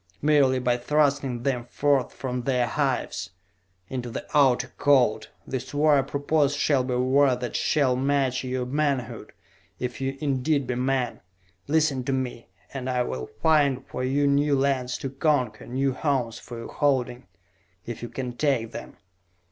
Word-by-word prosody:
Merely 145 -3 +4
by 125 -1 +1
thrusting 140 -2 +1
them 125 -3 -1
forth 140 +1 +1
from 125 -1 -4
the 125 -1 +1
hives, 100 - -1 0.6
into 125 0 -4
the 115 - -6
Outer 125 -3 +4
Cold! 125 -6 +3 0.2
This 130 +1 -5
war 145 -1 +4
I - - +4
propose 145 +1 0
shall 145 -2 +2
be 125 -1 -2
a - - 0
war 130 +1 +4
that 125 -2 -5
shall 140 -5 +2
match 135 -1 +1
your 130 -1 -2
manhood, 140 -2 -2 0.5
if 125 +1 -5
ye 135 0 -2
indeed 140 0 0
be 125 - -2
men! 125 -1 -1 0.5
Listen 150 -3 +2
to 135 - 0
me, 125 -3 -3 0.3
and 130 -2 -4
I 125 -1 +1
will 65 - -4 0.2
find 145 -5 +3
for - - -5
you 140 +3 +1
new 140 +1 +3
lands 130 -2 0
to 135 - -4
conquer, 135 -6 0
new 135 +2 0
homes 130 -5 -1
for 120 - -9
your 115 - -8
holding, 130 -5 0 0.6
if 120 -2 -6
ye 120 - -5
can 125 +1 -5
take 125 -6 0
them!" - - -9
130 Hz, 165 wpm, -25 LUFS, 125-140 Hz, 0.6 s, Merely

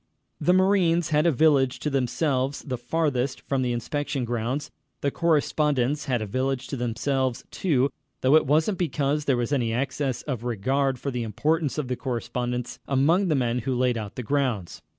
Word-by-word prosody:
The 180 - +3
marines 185 -3 +3
had 155 +1 +3
a - - +5
village 135 -2 +3
to 150 - -1
themselves, 135 +1 0
the 130 -4 -4
farthest 130 -1 -1
from 135 -1 -1
the 125 -1 0
inspection 135 +2 -2
grounds. 120 +4 -2 0.3
The 140 - 0
correspondents 150 -4 +1
had 125 -5 0
a - - -3
village 130 +4 -1
to - - -3
themselves, 130 +1 -1
too, 140 -7 +1 0.3
though 130 +3 +5
it 155 - +4
wasn't 160 +7 +2
because 150 -3 0
there 135 -3 +2
was 120 +4 -1
any 115 -5 +1
excess 130 0 -2
of 125 -6 -4
regard 130 +4 0
for 140 +3 -4
the 125 -1 -2
importance 150 - 0
of 150 -4 -2
the 125 - -1
correspondents 125 -1 -3
among 160 +8 +3
the 155 - +2
men 125 -2 +1
who 130 +2 -2
laid 125 -1 +2
out 105 -3 -5
the 125 - -4
grounds. 125 -8 -1
135 Hz, 180 wpm, -25 LUFS, 125-150 Hz, 0.3 s, a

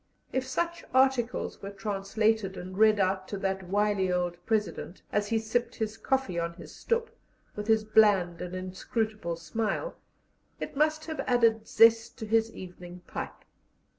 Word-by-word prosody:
If 260 0 -1
such 340 +5 -2
articles 260 -2 +2
were 200 - -5
translated 200 0 0
and 185 +1 -7
read 215 0 +5
out 190 0 +1
to 200 - -4
that 190 -1 -1
wily 205 -2 +2
old 175 -1 -1
President, 210 -4 -2
as 205 0 +1
he 225 - +1
sipped 225 +2 -1
his 220 -1 -2
coffee 225 -5 0
on 170 0 -2
his - - -11
stoep, 465 0 -1 0.4
with 210 0 -5
his 220 -1 +4
bland 205 -5 +4
and 180 0 -5
inscrutable 185 0 -3
smile, 215 - -2 0.6
it - - -5
must 310 +2 +2
have 315 -1 -5
added 230 -3 +3
zest 225 +1 +5
to 225 - -5
his 225 +1 +2
evening 180 -2 -10
pipe. - - -7
215 Hz, 155 wpm, -29 LUFS, 190-230 Hz, 0.6 s, read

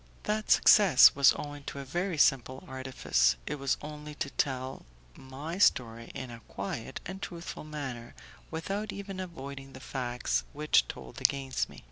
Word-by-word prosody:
That 215 0 -1
success 180 -11 +8
was 140 -1 +6
owing 145 -1 -7
to - - -6
a 140 - -5
very 175 +5 -2
simple 130 -2 +2
artifice; 130 - +1
it 150 0 -4
was 135 0 +1
only 150 0 -8
to 145 -2 -3
tell 130 -1 -2 0.3
my 145 +7 -7
story 115 - +2
in 130 -2 -6
a 115 -1 -10
quiet 110 +6 -5
and 190 +2 -7
truthful 170 -3 -6
manner, 135 -6 -6 0.3
without 195 +6 -3
even 195 -1 -6
avoiding 140 -6 -7
the 130 - -9
facts 125 -2 -2
which 150 +1 +3
told 65 -1 -9
against 135 -2 +1
me. - - -12
140 Hz, 155 wpm, -30 LUFS, 130-165 Hz, 0.3 s, success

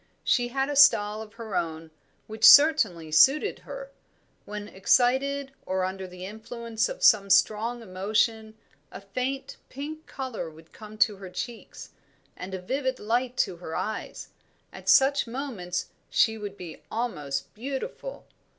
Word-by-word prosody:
She 245 -1 +2
had 270 +2 -1
a 290 - -3
style 215 -6 +5
of 215 -1 -11
her 225 -3 -7
own, 160 -1 -3 0.3
which 220 +1 -9
certainly 225 - +7
suited 275 - +4
her. - - -9 0.5
When 210 0 -6
excited, 265 +7 +1
or 185 0 -1
under 190 0 -5
the 180 0 -9
influence 225 +2 -3
of - - -7
some 200 -2 +5
strong 220 +4 +2
emotion, 220 +3 -1 0.3
a - - -8
faint 255 +7 -4
pink 305 +4 -7
colour 255 -10 -5
would 160 +1 -18
come 215 0 -11
to 215 -2 +3
her 190 -1 -9
cheeks, 235 +5 -8 0.4
and 190 +1 -7
a - - -5
vivid 260 +4 -2
light 240 +3 -1
to 180 - -9
her 160 -2 -7
eyes; 220 - -5 0.4
at - - -6
such 275 0 +5
moments 225 -9 -4 0.2
she 220 - +3
would 205 -2 -7
be 175 -3 -9
almost 150 - -3
beautiful. 275 - -6
220 Hz, 145 wpm, -27 LUFS, 190-265 Hz, 0.5 s, certainly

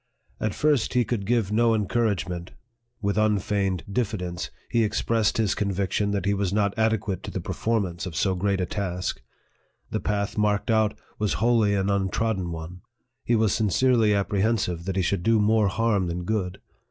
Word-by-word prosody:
At 110 -2 -1
first, 145 -7 +1
he 125 -1 +3
could 105 -5 -2
give 115 -4 +1
no 115 +1 +3
encouragement; 100 -5 -1 0.5
with 100 +1 +1
unfeigned 100 -3 +1
diffidence, 100 -5 -2 0.2
he 115 - +3
ex 105 -1 -1
pressed 115 -3 +1
his 110 -3 +2
conviction 100 0 -1
that 100 -3 -1
he 100 - +2
was 100 -2 -1
not 100 -1 +1
adequate 110 -3 0
to - - -7
the - - -4
performance 100 -6 -2
of 85 - -7
so 95 +3 +1
great 95 +1 0
a 90 - +1
task; 90 -2 -3 0.7
the - - -1
path 105 0 -2
marked 105 +1 +1
out 110 -1 +2 0.2
was 105 -2 +1
wholly 110 -2 +3
an 100 0 +1
untrodden 95 -1 0
one; 85 +2 -7 0.4
he 120 - +2
was 110 -3 +2
sincerely 110 +1 +3
ap 100 -1 +1
prehensive 100 -5 0
that 95 -1 -2
he 95 - +1
should 95 +1 0
do 115 +4 +3
more 105 0 +3
harm 100 -2 +1
than 85 +1 -3
good. 95 -2 -2
100 Hz, 175 wpm, -25 LUFS, 95-110 Hz, 0.7 s, he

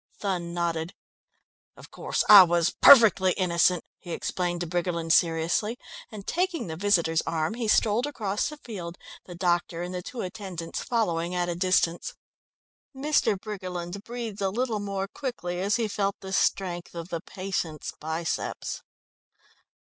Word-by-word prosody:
Thun 180 -4 -2
nodded. 170 0 -2 0.8
"Of - - -14
course, - - -1
I 205 -2 +12
was 175 -1 +3
perfectly 205 -8 +8
innocent," 180 -1 +2 0.2
he 175 - -7
explained 175 0 -2
to - - -1
Briggerland 170 -1 -2
seriously, 170 +7 +1 0.3
and 205 -3 -9
taking 355 -1 -1
the 160 -3 -5
visitor's 170 -4 +2
arm 160 +2 -1
he 235 -1 -3
strolled 220 +4 +3
across 210 -7 -2
the 300 - -9
field, 180 -11 -8 0.3
the 175 - -9
doctor 175 -1 0
and 180 +1 -5
the 180 - -3
two 235 +6 -6
attendants 180 -3 -5
following 175 -7 -1
at 175 0 0
a 175 - -2
distance. 175 -1 +1 0.8
Mr. 265 -7 +1
Briggerland 185 -2 -6
breathed 230 -3 -6
a 195 - +1
little 230 +1 -1
more 200 -1 -3
quickly 195 -8 -5
as 200 +2 +1
he 230 -2 0
felt 200 -1 -1
the 190 0 -7
strength 175 -3 0
of 170 +1 -6
the 170 -2 -4
patient's 180 -5 -4
biceps. 160 +1 -3
185 Hz, 150 wpm, -27 LUFS, 170-210 Hz, 0.8 s, I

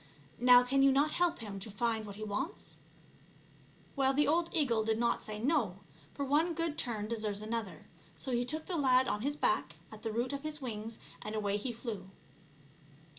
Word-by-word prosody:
Now 245 +1 +8
can 270 +2 +2
you 275 0 +6
not 285 +3 +3
help 350 -1 +2
him 205 -4 -6
to 195 - -7
find 220 +1 -1
what 200 - -8
he 215 - -6
wants 215 - -4 0.6
?" - - -27
Well, 270 -1 +2
the 295 - +3
old 335 +3 +2
eagle 250 -9 +2
did 220 0 +1
not 235 0 +1
say 215 -1 -5
no, 230 - +1 0.4
for 280 - -2
one 315 +5 +2
good 330 -2 -1
turn 220 -7 -2
deserves 215 -2 -2
another; 220 -3 -4 0.3
so 260 - -5
he 240 0 +2
took 310 +5 -3
the 355 - -2
lad 260 -2 +4
on 210 - -1
his 285 +4 -1
back - - 0 0.2
at 215 -1 -10
the 225 - -2
root 240 +5 -1
of 280 - -3
his 305 0 -4
wings 225 -3 -5 0.2
and 215 +1 -4
away 205 -2 0
he 240 +4 -3
flew. 220 -5 -6
240 Hz, 200 wpm, -33 LUFS, 215-285 Hz, 0.6 s, Now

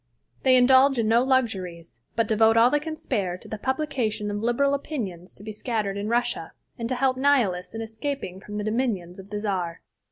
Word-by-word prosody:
They 260 -1 +5
indulge 260 +2 +6
in 225 -2 +1
no 230 +2 +4
luxuries, 190 - -1 0.2
but 230 -2 +1
devote 225 +1 +4
all 235 +2 +6
they 295 - +3
can 315 +1 -5
spare 195 - -2
to - - -14
the 215 - -6
publication 240 -6 -1
of 205 - -2
liberal 240 +5 +2
opinions 210 - -4
to - - -14
be 215 - -6
scattered 215 -2 -2
in 200 +1 -3
Russia, 240 -8 -1 0.3
and 230 0 -3
to 255 - 0
help 255 0 +1
Nihilists 235 -10 +1
in 225 - -3
escaping 225 -3 -5
from 210 +1 -7
the 210 - -2
dominions 215 -6 -2
of 195 +1 -11
the 210 0 -3
Czar. 185 -5 -2
225 Hz, 200 wpm, -25 LUFS, 200-260 Hz, 0.3 s, indulge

